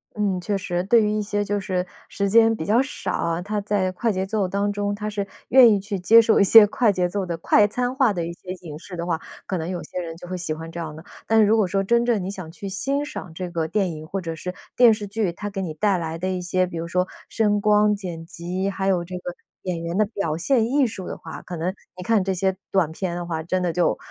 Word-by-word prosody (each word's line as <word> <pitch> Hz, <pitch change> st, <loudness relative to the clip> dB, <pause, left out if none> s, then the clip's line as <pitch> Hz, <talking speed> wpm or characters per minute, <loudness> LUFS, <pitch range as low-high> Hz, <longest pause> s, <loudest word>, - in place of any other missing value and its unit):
嗯， 200 Hz, -3 st, 0 dB
确 200 Hz, +2 st, -1 dB
实。 180 Hz, -2 st, -2 dB
对 225 Hz, +4 st, +4 dB
于 210 Hz, -, +1 dB
一 215 Hz, 0 st, 0 dB
些 205 Hz, 0 st, -1 dB
就 205 Hz, 0 st, -1 dB
是 185 Hz, -2 st, -2 dB, 0.2 s
时 200 Hz, 0 st, -1 dB
间 225 Hz, +2 st, +5 dB
比 160 Hz, -, -5 dB
较 225 Hz, +7 st, +4 dB
少 280 Hz, +2 st, -4 dB
啊， 170 Hz, +1 st, -1 dB
他 210 Hz, +3 st, -2 dB
在 200 Hz, -2 st, 0 dB
快 225 Hz, +5 st, 0 dB
节 190 Hz, -1 st, -1 dB
奏 200 Hz, -1 st, 0 dB
当 200 Hz, +2 st, 0 dB
中 205 Hz, 0 st, -2 dB
他 210 Hz, +1 st, -4 dB
是 205 Hz, -1 st, -3 dB, 0.2 s
愿 250 Hz, -3 st, +8 dB
意 205 Hz, -, +3 dB
去 200 Hz, 0 st, -4 dB
接 225 Hz, +6 st, +7 dB
受 225 Hz, -1 st, +3 dB
一 -, -, +6 dB
些 210 Hz, +2 st, +9 dB
快 215 Hz, +2 st, +2 dB
节 180 Hz, -2 st, 0 dB
奏 195 Hz, +2 st, -2 dB
的 170 Hz, -2 st, -3 dB
快 205 Hz, +5 st, +4 dB
餐 245 Hz, +4 st, -2 dB
化 260 Hz, -5 st, +3 dB
的 170 Hz, -3 st, -2 dB
一 170 Hz, -, -4 dB
些 180 Hz, +1 st, -9 dB
影 155 Hz, -4 st, -8 dB
视 180 Hz, +2 st, -9 dB
的 170 Hz, 0 st, -4 dB
话， 165 Hz, -2 st, -1 dB, 0.3 s
可 190 Hz, -, -2 dB
能 165 Hz, 0 st, -4 dB
有 180 Hz, -2 st, -3 dB
些 170 Hz, -, -6 dB
人 165 Hz, -1 st, -6 dB
就 175 Hz, +1 st, -10 dB
会 185 Hz, -, -4 dB
喜 165 Hz, -3 st, -2 dB
欢 165 Hz, +1 st, -8 dB
这 170 Hz, -, -7 dB
样 155 Hz, -2 st, -5 dB
的。 160 Hz, -, -11 dB, 0.2 s
但 225 Hz, 0 st, +4 dB
是 215 Hz, -, +6 dB
如 215 Hz, +2 st, +4 dB
果 210 Hz, -4 st, +3 dB
说 195 Hz, +2 st, 0 dB
真 235 Hz, +4 st, +3 dB
正 230 Hz, -6 st, +1 dB
你 190 Hz, -, -3 dB
想 185 Hz, -5 st, -7 dB
去 190 Hz, +4 st, -8 dB
欣 275 Hz, +9 st, -1 dB
赏 185 Hz, -, -7 dB
这 180 Hz, +2 st, -5 dB
个 165 Hz, -2 st, -2 dB
电 195 Hz, 0 st, 0 dB
影 155 Hz, -1 st, -8 dB
或 195 Hz, -, -3 dB
者 165 Hz, -2 st, -4 dB
是 180 Hz, +3 st, -5 dB, 0.2 s
电 240 Hz, -2 st, +7 dB
视 210 Hz, -1 st, -4 dB
剧， 205 Hz, -2 st, -1 dB
它 205 Hz, +4 st, -6 dB
给 195 Hz, -1 st, -4 dB
你 170 Hz, -4 st, -4 dB
带 195 Hz, +4 st, +1 dB
来 165 Hz, -1 st, -4 dB
的 185 Hz, +3 st, -2 dB
一 185 Hz, -1 st, -2 dB
些 185 Hz, +1 st, +1 dB
比 175 Hz, -2 st, -7 dB
如 165 Hz, +1 st, -4 dB
说 180 Hz, +2 st, 0 dB, 0.2 s
声 210 Hz, -2 st, +2 dB
光、 210 Hz, 0 st, +4 dB
剪 175 Hz, -5 st, -6 dB
辑， 180 Hz, +3 st, -3 dB
还 195 Hz, -1 st, -2 dB
有 185 Hz, -3 st, +2 dB
这 180 Hz, +1 st, -7 dB
个 180 Hz, 0 st, -6 dB, 0.3 s
演 175 Hz, -3 st, -3 dB
员 170 Hz, +2 st, -3 dB
的 215 Hz, -, +4 dB
表 200 Hz, -7 st, -3 dB
现 235 Hz, +6 st, +2 dB
艺 270 Hz, +1 st, +3 dB
术 195 Hz, -4 st, -7 dB
的 -, -, -5 dB
话， 160 Hz, -, -9 dB
可 175 Hz, -, -6 dB
能 175 Hz, +4 st, -1 dB, 0.2 s
你 180 Hz, -, -6 dB
看 215 Hz, 0 st, +2 dB
这 190 Hz, 0 st, 0 dB
些 190 Hz, +1 st, 0 dB, 0.2 s
短 180 Hz, -5 st, +2 dB
片 175 Hz, +1 st, -3 dB
的 175 Hz, 0 st, -4 dB
话， 160 Hz, -2 st, -3 dB
真 185 Hz, +3 st, -1 dB
的 175 Hz, -2 st, 0 dB
就 175 Hz, 0 st, +1 dB
190 Hz, 300 characters per minute, -23 LUFS, 175-210 Hz, 0.3 s, 些